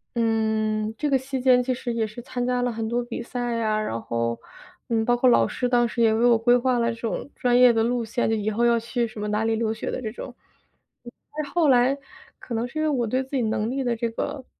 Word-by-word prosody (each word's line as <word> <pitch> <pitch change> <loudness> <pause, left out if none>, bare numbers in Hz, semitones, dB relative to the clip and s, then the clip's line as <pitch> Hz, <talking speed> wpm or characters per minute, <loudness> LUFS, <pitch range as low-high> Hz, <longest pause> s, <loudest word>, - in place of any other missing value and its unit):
嗯， 220 -1 0
这 300 - -1
个 275 - +4
期 265 0 -4
间 250 -1 +5
其 255 +1 0
实 245 -1 -4
也 225 -1 -1
是 220 +3 -9
参 245 0 -4
加 250 0 0
了 245 0 0
很 225 0 -4
多 240 +1 -1
比 240 0 -6
赛 245 -1 -3
呀， 215 -2 0
然 115 - -3
后， 115 0 -2 0.5
嗯， 225 -1 +1
包 245 0 +2
括 255 - +3
老 - - +5
师 250 - -2
当 245 -1 +3
时 235 - -3
也 220 - +4
为 225 +2 +2
我 235 -2 +5
规 240 +2 +4
划 245 0 +1
了 235 0 +1
这 230 - -12
种 230 +4 -3
专 245 -1 +2
业 250 -1 +7
的 225 -1 +2
路 240 0 0
线， 230 +2 -1
就 225 - +2
以 210 0 -1
后 225 +3 0
要 235 -1 +3
去 235 +1 -2
什 215 -1 -10
么 210 - -3
哪 210 +1 0
里 225 0 +1
留 220 -1 0
学 220 - -5
的 - - -4
这 220 - -3
种。 250 +2 -8 1.2
后 340 -3 +3
来 255 +2 +4 0.4
可 240 - -8
能 230 +2 -1
是 310 +5 -6
因 - - +1
为 - - +1
我 250 -5 0
对 255 +4 0
自 265 - -18
己 260 - +1
能 220 0 -1
力 270 0 -2
的 240 -1 0
这 235 - -1
个 270 +3 -4
235 Hz, 285 characters per minute, -24 LUFS, 225-250 Hz, 1.2 s, 业